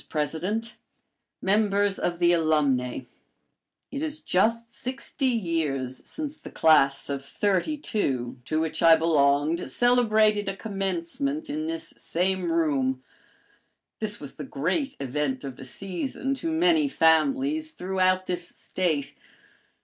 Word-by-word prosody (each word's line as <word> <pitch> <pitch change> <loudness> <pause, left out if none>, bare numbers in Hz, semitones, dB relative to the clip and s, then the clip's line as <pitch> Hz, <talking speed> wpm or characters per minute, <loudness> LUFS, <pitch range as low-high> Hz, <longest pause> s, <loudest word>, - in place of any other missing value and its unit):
PRESIDENT, 175 +10 -2 0.7
MEMBERS 205 0 +2
OF 175 -1 -1
THE 175 0 +4
ALUMNAE: 145 -7 +1 0.9
"It 280 - -4
is 310 -1 0
just 230 +3 +1
sixty 260 +2 -3
years 160 - -1
since 305 -1 -4
the - - -10
class 140 -4 +3
of 140 -1 -3
'32, 190 - -1
to 155 +5 -1
which 160 0 -2
I 165 -1 +8
belonged, 155 0 +2
celebrated 215 -4 +3
a 195 - -3
commencement 205 - -3
in 310 +2 -3
this 330 0 -3
same 180 0 -1
room. 135 -6 +1 1.0
This 210 -1 -3
was 140 -2 -8
the 150 - -5
great 185 - -2
event 135 0 -2
of 135 -2 -6
the 135 - -9
season 195 - -3
to 325 +4 -3
many 325 -2 +3
families 275 - +2
throughout 185 - +1
this 175 -1 -3
State. 160 -7 -2
185 Hz, 120 wpm, -26 LUFS, 150-245 Hz, 1.0 s, I